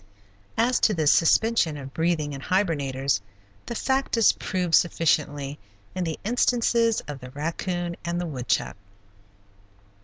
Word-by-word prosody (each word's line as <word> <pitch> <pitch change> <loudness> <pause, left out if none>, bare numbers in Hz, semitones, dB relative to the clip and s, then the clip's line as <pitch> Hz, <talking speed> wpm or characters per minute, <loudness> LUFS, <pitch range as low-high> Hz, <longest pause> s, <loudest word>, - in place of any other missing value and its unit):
As 235 +2 +2
to 215 - +3
the 160 -2 0
suspension 165 +1 +3
of 135 -1 -9
breathing 160 -3 0
in 135 - -7
hibernators, 140 - 0 0.5
the 235 - -4
fact 265 0 0
is 225 - +6
proved 180 -4 -3
sufficiently 150 -4 +1 0.3
in 185 - -2
the 160 -2 -4
instances 235 0 +2
of 145 -2 -6
the 125 -1 -10
raccoon 170 +5 -3
and 170 0 -2
the 175 - -2
woodchuck. 130 - -2
165 Hz, 130 wpm, -25 LUFS, 145-205 Hz, 0.5 s, is